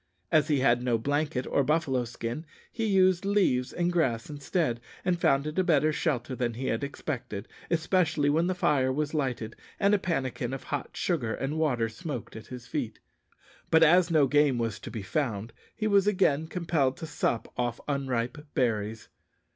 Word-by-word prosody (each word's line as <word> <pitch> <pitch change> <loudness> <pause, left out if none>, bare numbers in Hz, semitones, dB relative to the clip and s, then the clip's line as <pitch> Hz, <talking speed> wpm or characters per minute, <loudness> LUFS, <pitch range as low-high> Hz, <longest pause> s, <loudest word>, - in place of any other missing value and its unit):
As 155 -1 +4
he 145 -4 +2
had 120 -2 +4
no 125 -2 +1
blanket 145 +1 -1
or 140 - +1
buffalo 135 -4 +1
skin, 120 +5 -5 0.3
he 225 - -2
used 185 -2 +4
leaves 190 -11 +2
and 175 0 0
grass 130 -7 0
instead, 145 -4 -1 0.2
and 175 -2 +1
found 140 -4 +3
it 155 +4 -2
a - - +4
better 155 -3 +3
shelter 135 -6 -1
than 120 -2 -2
he 130 +3 -4
had 115 - -1
expected, 125 -7 -5 0.2
especially 165 -3 +2
when 160 +4 +3
the 185 - 0
fire 140 -6 +2
was 150 +3 -2
lighted, 130 -7 -2 0.2
and 200 +1 +4
a 205 - +4
pannikin 130 -8 -2
of 135 - -8
hot - - -5
sugar 130 -11 0
and 145 +4 -3
water 125 -8 +1
smoked 125 +3 -6
at 110 - -9
his 125 -1 -8
feet; 125 -5 -3 0.7
but 160 0 +6
as 175 +2 +5
no 155 -4 +4
game 145 -1 +3
was 115 -3 -2
to - - -8
be 110 -4 -5
found, 115 -3 -2 0.2
he 215 - -3
was 200 -2 +4
again 160 -7 +2
compelled 160 -7 0
to - - -6
sup 135 -6 -2
off 120 -1 -1
unripe 135 0 -2
berries. 110 -3 -1
145 Hz, 180 wpm, -28 LUFS, 120-165 Hz, 0.7 s, but